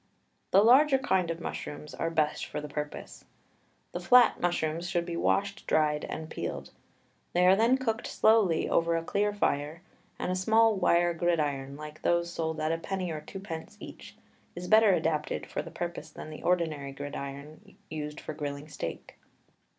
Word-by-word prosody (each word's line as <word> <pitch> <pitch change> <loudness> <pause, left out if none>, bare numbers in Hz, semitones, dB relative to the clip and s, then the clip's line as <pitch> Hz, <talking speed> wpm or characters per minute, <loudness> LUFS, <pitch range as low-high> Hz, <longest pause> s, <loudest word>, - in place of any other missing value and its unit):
The 195 +2 +5
larger 270 +4 +6
kinds 190 -9 +1
of 165 0 -3
mushrooms 150 -2 -6
are 165 - -2
best 155 -2 0
for - - -4
the 150 - -6
purpose. 150 0 -6 0.7
The - - -4
flat 250 -2 +5
mushrooms 170 -1 -1
should 175 -2 0
be 170 -1 -4
washed, 200 +3 0
dried, 150 -1 +2
and 160 - -6
peeled. - - -5 0.6
They 180 +1 +3
are 185 +1 +7
then 230 +5 +4
cooked 230 -3 -2
slowly 215 -7 +3
over 170 0 +2
a 165 - -3
clear 205 +4 0
fire, 160 -4 -1 0.3
and - - -2
a - - 0
small 220 +4 +4
wire 175 -2 +3
gridiron, 145 -5 -1
like 150 +1 -9
those 170 0 +1
sold 160 -1 -2
at 155 +1 0
a 165 - -1
penny 185 0 -3
or 155 -1 -5
twopence 165 -2 -8
each, - - -11 0.4
is 180 +1 -6
better 220 0 +6
adapted 155 -4 0
for - - -4
the - - -9
purpose 165 -1 -5
than 155 0 -9
the 155 - -9
ordinary 155 -6 0
gridiron 145 +6 -8
used 150 -1 -5
for - - -6
grilling 145 0 -5
steak. 85 - -7
165 Hz, 170 wpm, -29 LUFS, 150-190 Hz, 0.7 s, are